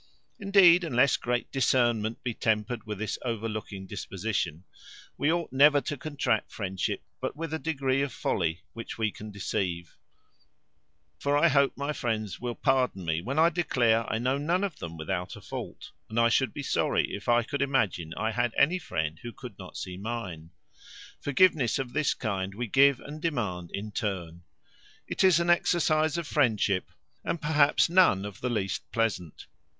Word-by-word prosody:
Indeed, 195 -3 +6
unless 140 -4 +3
great 120 0 -2
discernment 120 -4 +1
be 120 - -2
tempered 110 0 -1
with 105 -1 -4
this 110 +1 -3
overlooking 110 -4 -4
disposition, 95 -3 -3 0.5
we 145 - +1
ought 170 -3 -2
never 145 +2 +6
to 145 - -3
contract 135 -6 -1
friendship 95 -3 -3 0.2
but - - -3
with 160 +1 -5
a 160 - -1
degree 135 -4 0
of 140 -1 -1
folly 85 -5 -1
which 115 - -7
we 110 -2 0
can 110 +2 -9
deceive; 90 -4 -3 1.2
for 145 +1 +1
I - - +5
hope 140 0 +3
my 140 +2 -2
friends 110 -7 -3
will 120 -1 -4
pardon 130 -9 +1
me 80 0 0
when 130 - -4
I 165 +2 +6
declare, 120 -9 +1
I 110 - 0
know 130 +4 0
none 170 +6 0
of 190 -7 -3
them 85 -1 -7
without 90 +3 -3
a - - -10
fault; - - -7 0.2
and 110 +2 -1
I 115 0 +5
should 130 +3 +2
be 145 - -6
sorry - - +1
if 100 +3 -5
I 120 0 +4
could 140 +4 -3
imagine 110 - 0
I 110 - 0
had 120 +1 -1
any 175 +6 +4
friend 80 - -3
who 120 - -6
could 120 -5 -11
not 90 -1 -9
see 90 -1 -6
mine. 95 -7 -5 0.7
Forgiveness 145 -5 +3
of 130 -2 -4
this 150 -1 +1
kind 95 -4 -3
we 120 +3 -2
give 135 +4 +4
and 150 +2 -9
demand 105 - -2
in 105 +2 -5
turn. 90 -5 -4 0.7
It - - -1
is 185 -4 +6
an 170 0 +3
exercise 160 -2 +2
of 170 - -3
friendship, 110 -10 +1 0.3
and 170 - -2
perhaps 150 -2 +3
none 170 - +4
of 100 -2 -8
the 125 - -1
least 95 -9 -2
pleasant. 95 -7 -2
120 Hz, 175 wpm, -28 LUFS, 100-145 Hz, 1.2 s, Indeed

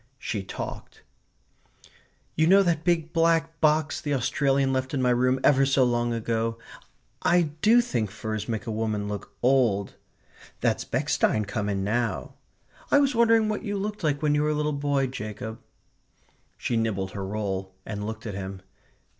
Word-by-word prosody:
She 110 -6 -3
talked: 95 - -7 1.3
"You 160 +1 +3
know 195 +2 +6
that 165 -4 0
big 165 -2 0
black 165 -1 +2
box 155 0 +2
the 145 -1 -1
Australian 135 +1 +1
left 130 +1 -1
in 130 - 0
my 125 - +3
room 125 +2 +2
ever 135 -1 +5
so 135 -1 +3
long 120 -1 +1
ago?... 115 0 -1 0.6
I 175 -3 +3
do 230 +3 +6
think 120 - -2
furs 110 +1 -5
make 110 -2 -3
a 115 - -3
woman 110 -2 -2
look 100 0 -6
old.... 120 -6 +2 0.7
That's - - 0
Bechstein 105 -1 +1
come 105 0 -2
in 100 -1 -1
now.... 110 0 -1 0.6
I - - +5
was 280 -1 +3
wondering 230 -2 +4
what 215 -1 -2
you 205 -3 -3
looked 205 0 -4
like 145 -1 0
when 150 -1 +3
you 150 - +2
were 150 - +1
a 150 - +1
little 150 0 0
boy, 140 -1 0
Jacob." 110 -2 -6 1.0
She 120 - -1
nibbled 100 -4 -1
her 100 - -5
roll 95 -2 -3
and 105 -1 -5
looked 110 +2 -6
at 105 - -4
him. 95 -1 -6
125 Hz, 170 wpm, -26 LUFS, 110-155 Hz, 1.3 s, know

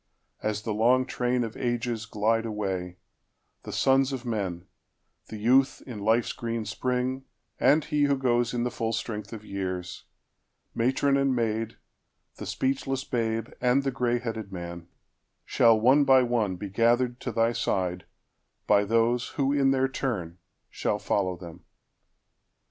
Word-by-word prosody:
As 105 0 -2
the 110 - -2
long 125 +4 +3
trainOf 125 -3 -1
ages 120 -2 -2
glide 110 +2 +1
away, 95 -4 -3 0.6
the - - -8
sons 135 0 +3
of 130 -2 -5
men, 95 -7 -3 0.6
The 110 - -7
youth 130 +5 +3
in 120 -5 -7
life's 110 +3 +1
green 115 -1 -3
spring, 125 +4 -2 0.3
and 145 +4 +4
he 150 -1 +2
who 140 -1 +2
goesIn 120 -2 +1
the 125 - -1
full 115 0 -2
strength 110 -1 -4
of 110 -2 -8
years, 90 -3 -5 0.7
matron 135 +4 +2
and 135 -1 +2
maid, 115 -1 -1 0.6
The - - -7
speechless 135 0 -1
babe, 115 -2 -2
and 125 +2 +3
the 135 - 0
gray 120 -2 0
headed 110 -4 -5
man—Shall 85 +5 -1
one 130 +6 +5
by 130 -2 +6
one 115 -6 0
be 100 +3 -6
gathered 120 +4 +2
to 125 - -4
thy 115 +1 +2
sideBy 95 +1 -2
those, 115 +2 +2
who 140 0 +2
in 140 -2 +3
their 135 0 +2
turn 100 - -3 0.3
shall - - -1
follow 95 -3 -1
them. 85 -2 -11
115 Hz, 140 wpm, -27 LUFS, 105-130 Hz, 0.7 s, by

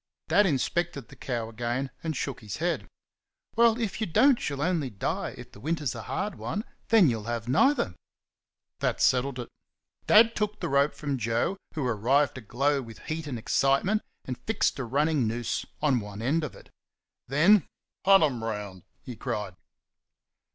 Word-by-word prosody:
Dad 195 +5 +5
inspected 150 -1 -1
the - - -13
cow 120 -4 -3
again, 120 +4 -3
and 160 -4 -2
shook 135 -2 -3
his 105 -3 -6
head. - - -1 0.7
"Well, 230 0 +4
if 225 -1 -3
you 220 - 0
don't 260 - +4
she'll 140 0 -2
only 165 -6 0
die, 100 -4 -3
if - - -11
the - - -14
winter's 150 -4 -1
a - - -6
hard 205 +1 -3
one; 210 - -3 0.2
then 220 -7 +6
you'll 110 -5 -1
have 120 0 -3
neither." 245 - +3 0.9
That - - 0
settled 130 +1 +2
it. 120 - -5 0.6
Dad 225 +2 +6
took 210 -1 -1
the - - -2
rope 140 +2 +2
from 140 -3 -3
Joe, 115 - 0 0.2
who 150 -4 -1
arrived 125 +5 +2
aglow 135 +4 0
with 115 -3 -10 0.2
heat 160 -1 -5
and 130 -4 -3
excitement, 140 - +2 0.2
and 130 -1 -5
fixed 215 -8 +1
a 130 - -2
running 140 +1 +1
noose 115 +1 -2 0.2
on 140 -5 +3
one 105 0 -7
end 155 +6 +1
of 150 - -5
it. - - -16 0.6
Then 170 - +5 0.4
"Hunt 195 -2 +7
'em 125 -7 0
round!" 105 -4 -4 0.2
he 125 - -7
cried. 105 -6 -4
140 Hz, 170 wpm, -28 LUFS, 120-170 Hz, 0.9 s, Hunt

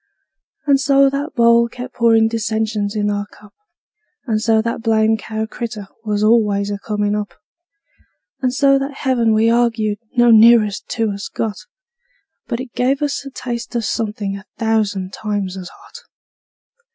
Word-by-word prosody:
And 280 -2 +4
so 275 0 +4
that 285 +3 -4
bowl 235 -1 +4
kept 250 +2 -8
pourin' 225 -2 +4
dissensions 220 -2 -2
in 205 -1 0
our 205 0 -3
cup; 210 -1 -18 0.7
And 220 -4 0
so 225 -1 +3
that 230 +1 -2
blamed 220 -1 +2
cow 220 0 -4
critter 220 -3 -7
was 210 -1 -1
always 210 -2 +2
a 200 - -4
comin' 210 0 -1
up; 210 -1 -4 1.1
And 255 -2 +1
so 275 +1 +3
that 275 +1 -4
heaven 245 -4 +2
we 220 +1 +3
arg'ed 230 -3 +1 0.2
no 240 -1 +6
nearer 225 -1 +7
to 220 +2 -3
us 200 0 -6
got, 220 - -4 0.8
But 235 -2 -3
it 255 -2 -8
gave 270 +3 0
us 285 -1 -2
a - - -6
taste 240 -2 -6
of 230 -2 -1
somethin' 210 -3 -3
a 195 - -13
thousand 210 -4 -1
times 205 -3 -3
as 185 -1 -7
hot. - - -15
225 Hz, 160 wpm, -18 LUFS, 210-240 Hz, 1.1 s, nearer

